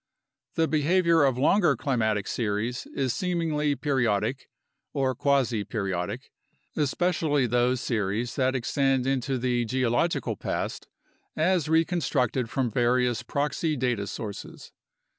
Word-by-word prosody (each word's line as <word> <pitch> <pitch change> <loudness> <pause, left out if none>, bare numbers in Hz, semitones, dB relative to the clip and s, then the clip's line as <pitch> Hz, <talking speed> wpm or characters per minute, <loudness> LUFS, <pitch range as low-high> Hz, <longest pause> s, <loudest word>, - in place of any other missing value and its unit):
The 165 0 +2
behavior 165 +1 +3
of 135 -3 +2
longer 155 +2 +3
climatic 110 -6 0
series 115 +2 -2
is 130 -3 0
seemingly 160 -5 0
periodic, 130 -3 0 0.4
or 135 -2 +1
quasi 125 -5 +1
periodic, 95 -5 -3 0.4
especially 150 -2 +1
those 120 +1 +1
series 110 +1 -1
that 130 0 +1
extend 135 +1 +1
into 135 0 0
the 120 -1 0
geological 130 +6 0
past - - -4 0.5
as 165 -1 +1
reconstructed 160 - +1
from 125 -2 -1
various 120 0 +2
proxy 150 +2 -1
data 120 -6 -1
sources. 105 -1 -7
130 Hz, 110 wpm, -26 LUFS, 120-150 Hz, 0.5 s, behavior